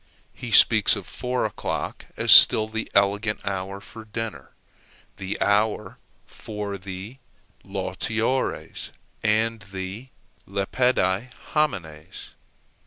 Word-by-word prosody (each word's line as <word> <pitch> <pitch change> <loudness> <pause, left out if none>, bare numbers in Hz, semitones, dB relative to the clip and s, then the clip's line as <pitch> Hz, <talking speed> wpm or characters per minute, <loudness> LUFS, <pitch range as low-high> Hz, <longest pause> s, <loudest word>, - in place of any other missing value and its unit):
He - - -8
speaks - - +6
of - - -7
four 125 0 -2
o'clock - - -4
as - - +3
still 110 -1 +9
the 110 +1 -5
elegant 100 +2 +1
hour 95 0 -4
for 110 +2 -12
dinner 110 0 -6 0.7
the 95 +1 -5
hour 105 +1 0 0.3
for 105 -2 -6
the 95 +6 -8 0.5
lautiores 105 +6 -2 0.3
and 110 +1 +1
the 95 +5 -7 0.4
lepidi 100 +1 0 0.2
homines. 90 - -3
105 Hz, 100 wpm, -24 LUFS, 95-115 Hz, 0.7 s, still